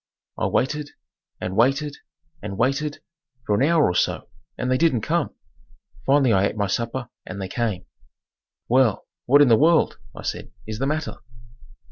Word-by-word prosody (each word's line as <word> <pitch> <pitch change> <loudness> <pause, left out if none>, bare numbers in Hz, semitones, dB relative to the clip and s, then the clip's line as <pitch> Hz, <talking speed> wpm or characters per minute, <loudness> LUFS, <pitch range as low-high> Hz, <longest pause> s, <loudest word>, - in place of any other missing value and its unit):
I - - -1
waited 150 +3 0 0.5
and 95 - -4
waited 140 +6 +2 0.4
and 100 -1 -6
waited 140 +5 0 0.4
for 105 - +1
an 100 - +2
hour 155 +2 +4
or 90 - +1
so; - - 0 0.3
and 125 0 -1
they 130 - +3
didn't 155 -8 +3
come. - - -1 0.7
Finally 135 -3 +4
I 95 0 +3
ate - - -6
my 100 - +1
supper 115 +5 -2
and 95 +2 -7
they 95 - -3
came. 110 -1 -2 0.8
"Well, 125 -4 +3 0.2
what 145 +3 +7
in - - +4
the 115 -2 +6
world," 165 +2 +3 0.2
I - - -9
said, - - -4 0.2
"is 110 0 -5
the 135 - 0
matter?" 155 +1 -2
130 Hz, 165 wpm, -23 LUFS, 105-145 Hz, 0.8 s, what